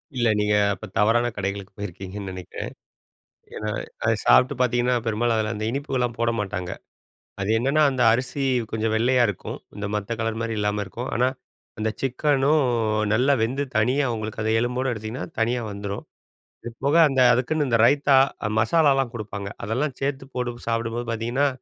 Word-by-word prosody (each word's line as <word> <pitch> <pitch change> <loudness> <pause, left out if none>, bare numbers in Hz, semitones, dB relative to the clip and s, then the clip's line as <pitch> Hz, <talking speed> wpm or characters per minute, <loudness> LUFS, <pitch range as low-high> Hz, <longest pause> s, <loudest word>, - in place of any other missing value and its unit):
இல்ல, 120 -2 +2
நீங்க 105 0 +2 0.2
அப்ப 95 - -8
தவறான 115 +3 +3
கடைகளுக்கு 100 0 -4
போயிருக்கீங்கன்னு 95 0 -6
நெனைக்கிறேன். 90 -1 -7 0.8
ஏன்னா, 105 0 -3 0.3
அதை - - +3
சாப்பிட்டு 125 - +5
பாத்தீங்கன்னா, 125 0 +2
பெரும்பாலும் 115 +1 +1
அதில 110 0 0
அந்த 105 +1 -4
இனிப்புகள்லாம் 125 -3 -2
போட 115 0 +2
மாட்டாங்க. 95 -3 -4 0.7
அது 95 - -1
என்னன்னா, 140 +5 +2
அந்த 130 -2 0
அரிசி 130 +4 -1 0.3
கொஞ்சம் 110 0 -1
வெள்ளையா 125 +2 +3
இருக்கும். 100 - -5 0.2
இந்த 100 - -4
மத்த 105 +3 -3
கலர் 115 0 -1
மாரி 115 -1 -2
இல்லாம, 105 0 0
இருக்கும். 120 +6 -6
ஆனா, 125 +1 +3 0.5
அந்த 110 0 0
சிக்கனும் 140 +2 +2 0.5
நல்லா 130 +5 +3
வெந்து, 130 +5 0
தனியாக 125 +3 +2
உங்களுக்கு 110 0 -5
அதை 110 0 +1
எலும்போட 125 +2 -1
எடுத்தீங்கன்னா, 110 +3 -5
தனியா 120 +1 +1
வந்துரும். 100 0 -5 0.6
இது 120 - -6
போக, 145 +4 +3
அந்த 135 -1 +1
அதுக்குன்னு 140 +5 +1
இந்த 115 - +3
ரைத்தா, 140 0 +4 0.4
மசாலாலாம் 135 0 +3
குடுப்பாங்க. 100 -3 -5 0.2
அதெல்லாம் 125 +6 -1
சேத்து 135 -1 -2
போட்டு 120 -1 -4
சாப்பிடும்போது 115 +1 -1
பாத்தீங்கன்னா, 120 +5 0
120 Hz, 155 wpm, -24 LUFS, 105-130 Hz, 0.8 s, சாப்பிட்டு